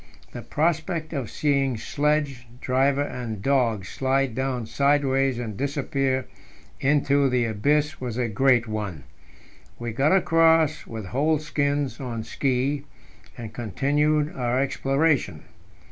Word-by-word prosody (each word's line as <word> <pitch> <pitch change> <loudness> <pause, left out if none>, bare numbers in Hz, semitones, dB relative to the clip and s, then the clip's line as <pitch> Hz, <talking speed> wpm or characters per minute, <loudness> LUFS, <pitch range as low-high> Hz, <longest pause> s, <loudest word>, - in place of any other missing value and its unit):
The - - -7
prospect 160 +1 -1
of 135 -7 -3
seeing 140 -4 0
sledge, 145 -1 -1
driver, 135 +3 +2
and 120 -6 -5
dogs 115 -5 +1
slide 135 -1 0
down 130 -2 -2
sideways 135 0 +2
and 115 -4 -5
disappear 135 0 -1 0.5
into 140 0 +2
the 125 -2 +1
abyss 145 +8 0
was 125 -3 -4
a 125 -1 0
great 120 +2 +3
one. 105 -9 -4 0.7
We 120 -1 -4
got 135 +7 +2
across 165 -4 +3
with 110 -3 -6
whole 150 +10 +1
skins 145 -4 -1
on 120 -4 -4
ski, 135 +4 -1 0.5
and 115 -3 -7
continued 145 - 0
our 125 -1 0
exploration. 140 +2 0
135 Hz, 120 wpm, -24 LUFS, 120-145 Hz, 0.7 s, great